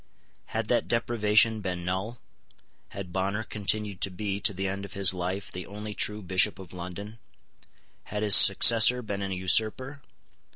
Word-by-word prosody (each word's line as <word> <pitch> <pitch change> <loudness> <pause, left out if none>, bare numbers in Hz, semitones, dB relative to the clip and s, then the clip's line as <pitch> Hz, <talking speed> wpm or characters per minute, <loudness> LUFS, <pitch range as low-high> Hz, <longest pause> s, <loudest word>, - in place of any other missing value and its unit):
Had 110 -1 -4
that 120 - 0
deprivation 110 -2 +1
been 90 -3 -5
null? 95 +6 -4 0.7
Had 90 -3 -9
Bonner 100 +3 -2
continued 105 -2 -3
to - - 0
be, 100 +1 -5
to 100 - +2
the 95 0 -4
end 100 +1 -5
of 100 - -10
his 95 -1 +2
life, 95 +2 -5
the 90 0 -8
only 105 +1 -8
true 105 +2 -4
Bishop 95 +3 +1
of 95 -2 -13
London? 90 +5 -9 0.9
Had 105 +1 -5
his 105 -2 +6
successor 115 +5 +6
been 100 -2 -6
an 100 -1 -5
usurper? 110 +9 0
100 Hz, 160 wpm, -26 LUFS, 95-110 Hz, 0.9 s, his